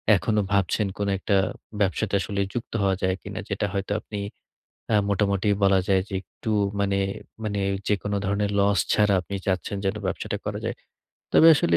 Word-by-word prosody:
এখনো 105 +2 +1
ভাবছেন 100 +2 +2
কোনো 100 -1 0
একটা 100 +1 0 0.5
ব্যবসাতে 100 +2 0
আসলে 100 0 -2
যুক্ত 120 - -5
হওয়া 95 -1 +3
যায় 95 0 +2
কিনা। - - -6
যেটা - - 0
হয়তো 100 0 -2
আপনি 105 - -6 0.8
আ - - +6
মোটামুটি 100 0 +1 0.2
বলা 95 -1 +5
যায় 95 -1 +4
যে 100 - -6
একটু 110 - -7 0.3
মানে 100 -1 +1 0.5
মানে 100 -1 -1 0.3
যেকোনো 105 0 0
ধরনের 100 +1 0
লস 100 -1 +3
ছাড়া 105 -1 +4
আপনি 100 - -7
চাচ্ছেন 95 +1 -1
যেন 95 +2 0
ব্যবসাটা 95 - -2
করা - - -2
যায়। - - -1 0.6
তবে 160 - +7
আসলে 85 - +3
100 Hz, 170 wpm, -25 LUFS, 95-105 Hz, 0.8 s, তবে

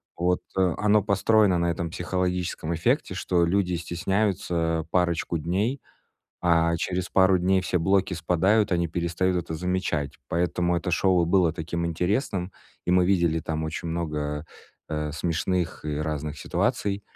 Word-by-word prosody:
вот, 90 +1 +1 0.2
э, 90 -3 +3
оно 105 0 +3
построено 105 -1 +3
на 85 0 +1
этом 85 0 -3
психологическом 90 -1 -2
эффекте, 80 - 0
что 85 -2 +1
люди 90 +1 +1
стесняются 85 -2 -1
парочку 85 -2 +1
дней, 100 - -1 0.6
а 85 -1 +3
через 90 +2 -2
пару 95 0 +5
дней 95 +2 +2
все 90 - -1
блоки 95 +2 +1
спадают, 90 +5 +2
они 85 -1 +1
перестают 85 +2 0
это 85 -1 -3
замечать. 80 -5 -1 0.2
Поэтому 85 +1 0
это 90 +2 -2
шоу 90 0 +3
и - - -4
было 90 -2 +3
таким 85 +1 -3
интересным, 90 - -1 0.4
и - - +1
мы 90 0 +4
видели 85 -4 +2
там 80 0 -3
очень 80 +2 -4
много, 75 -2 -3 0.4
э, 75 -1 -3
смешных 85 +2 -2
и 75 -1 -2
разных 75 0 -3
ситуаций. 100 +7 -1
85 Hz, 145 wpm, -25 LUFS, 80-95 Hz, 0.6 s, пару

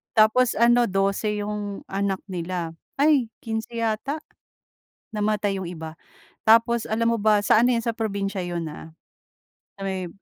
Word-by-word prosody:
Tapos 220 +3 +5
ano, 240 +1 +5
12 200 +2 0
'yong 205 -1 -4
anak 195 -1 -1
nila, 175 -2 -4 0.2
ay, 280 -6 +4
15 220 0 -4
yata, 230 +7 -1 1.0
namatay 210 -1 0
'yong 175 - -5
iba. 160 -2 -7 0.6
Tapos, 230 +1 +5
alam 230 +1 +1
mo - - -6
ba, 210 -1 +4
sa 220 - +5
ano 245 +1 +4
'yon 230 -1 0
sa 230 - 0
probinsiya 200 -3 -2
'yon 175 -1 -3
ah- 160 +1 -11 0.9
sa - - -5
may 190 -2 -2
210 Hz, 145 wpm, -24 LUFS, 195-230 Hz, 1.0 s, Tapos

